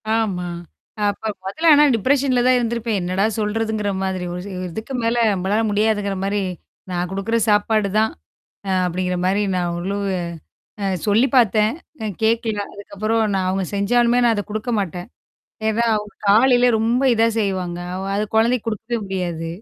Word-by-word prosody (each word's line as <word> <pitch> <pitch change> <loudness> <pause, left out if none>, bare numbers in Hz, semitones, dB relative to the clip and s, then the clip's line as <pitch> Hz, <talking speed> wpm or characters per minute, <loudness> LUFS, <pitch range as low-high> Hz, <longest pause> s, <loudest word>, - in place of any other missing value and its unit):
ஆமா. 195 -6 -1 0.6
அப்ப 210 +2 -4 0.2
மொதல்ல 315 +13 -1
ஆனா 295 0 +6
டிப்ரஷன்ல 255 +2 +2
தான் 255 - +5
இருந்திருப்பேன். 230 -2 -1
என்னடா 185 +3 0
சொல்றதுங்கிற 215 0 -1
மாதிரி. 190 -1 -2
ஒரு 180 - -5
ச - - -7
ஒரு 185 - -4
இதுக்கு 220 +8 -6
மேல 230 +1 +1 0.2
நம்பளால 195 +3 0
முடியாதுங்கிற 205 -1 +1
மாரி, 200 +1 0 0.5
நான் 180 0 -2
குடுக்குற 195 +4 -1
சாப்பாடு 210 0 +2
தான். 220 - +2 0.6
அ - - +1 0.2
அப்படிங்கிற 180 +1 -2
மாரி 195 +3 +2
நான் 175 -1 0
ஓரளவு 195 +2 -2 0.7
அ - - 0 0.2
சொல்லி 220 +6 +4
பாத்தேன். 215 -1 +3 0.3
அ - - -2 0.2
கேக்கல. 225 -1 +1
அதுக்கப்புறம் 215 +3 -2
நான் 190 -1 0
அவங்க 190 0 -1
செஞ்சாலுமே, 240 +4 +3
நான் 230 -1 +3
அத 205 - -2
குடுக்க 215 +3 -3
மாட்டேன். 180 -2 -4 0.6
ஏன்னா, 225 +2 +1
அவங்க 210 0 -6
காலையில 245 +4 +5
ரொம்ப 230 +4 +1
இதா 225 0 +3
செய்வாங்க. 185 -4 -2 0.2
அவ 190 - -4
அது 210 - 0
குழந்தைக்கு 230 +1 +2
குடுக்கவே 225 +2 -3
முடியாது. 175 -4 -3
210 Hz, 155 wpm, -21 LUFS, 190-230 Hz, 0.7 s, ஆனா